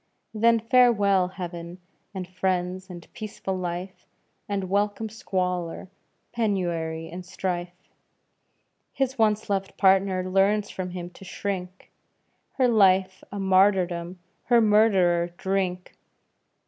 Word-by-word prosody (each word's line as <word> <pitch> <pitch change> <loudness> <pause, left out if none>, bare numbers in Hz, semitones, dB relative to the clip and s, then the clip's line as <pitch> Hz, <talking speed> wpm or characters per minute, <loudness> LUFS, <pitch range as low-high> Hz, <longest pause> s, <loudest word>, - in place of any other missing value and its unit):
Then 230 +1 +4
farewell 215 -5 +4
heaven 175 -2 -7 0.3
and 190 -3 -6
friends, 185 0 -2
and 175 -2 -10
peaceful 205 -3 -5
life, 180 +1 -5 0.4
And 195 -2 -2
welcome 205 +3 0
squalor, 180 -5 -3 0.4
penury, 175 -8 -1
and 180 +2 -7
strife; 180 -1 -3 1.2
His 265 -1 -1
once 215 -1 +2
loved 195 -2 -2
partner 190 -1 +3
learns 200 +2 +2
from 185 -1 -5
him 175 -1 -7
to 195 - -14
shrink, 185 -1 -5 0.6
Her 260 -2 +2
life 190 -4 +3
a 205 - -5
martyrdom, 185 -2 +2 0.3
her 240 -1 +5
murderer 190 -6 +3
Drink! 190 -2 -2
190 Hz, 110 wpm, -25 LUFS, 180-205 Hz, 1.2 s, her